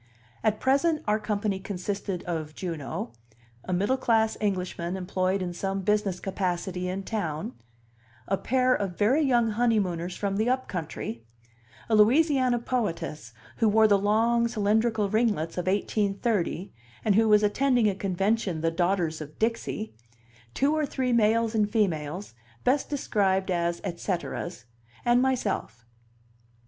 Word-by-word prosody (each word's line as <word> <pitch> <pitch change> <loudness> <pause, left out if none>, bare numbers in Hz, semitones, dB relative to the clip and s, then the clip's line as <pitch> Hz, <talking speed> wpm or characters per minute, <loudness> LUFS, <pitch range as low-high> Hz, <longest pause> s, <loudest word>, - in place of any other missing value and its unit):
At 215 0 +1
present 300 +4 +2
our 210 +1 +2
company 205 -2 -1
consisted 195 -1 -4
of 155 -3 -4
Juno; 165 - -4 0.5
a - - -4
middle 205 +9 +1
class 225 -3 +2
Englishman 185 -3 -2
employed 185 +1 -1
in 175 -1 -4
some 195 +2 -2
business 205 -2 0
capacity 180 -1 -2
in 190 +2 -3
town; 160 - -3 0.7
a 195 - +2
pair 255 +4 +2
of 195 -6 -2
very 245 +9 +3
young 240 -5 +3
honeymooners 195 -7 0
from 200 -1 -2
the 220 +3 +1
"up 255 0 0
country"; 155 - -5 0.6
a 230 - -1
Louisiana 255 +3 +4
poetess, 170 - -3 0.3
who 225 - +3
wore 220 +1 +5
the 200 -2 +4
long, 230 +3 +2
cylindrical 220 -1 +1
ringlets 205 -7 0
of 180 - -4
1830, 200 -1 0 0.3
and 210 - +4
who 220 +2 +4
was 210 0 +5
attending 245 +2 +3
a 205 - +2
convention 195 -1 -1
the 165 0 +1
Daughters 175 -2 0
of 150 0 -9
Dixie; 220 -1 -2 0.6
two 285 +3 +2
or 305 -2 0
three 255 -2 -1
males 225 0 +3
and 210 -2 +2
females, 180 - -1 0.3
best 270 +3 +1
described 195 -9 0
as 170 -1 0
et 170 -1 -4
ceteras; 175 -3 -4 0.4
and 240 +1 +4
myself. 205 - -1
205 Hz, 140 wpm, -27 LUFS, 180-230 Hz, 0.7 s, wore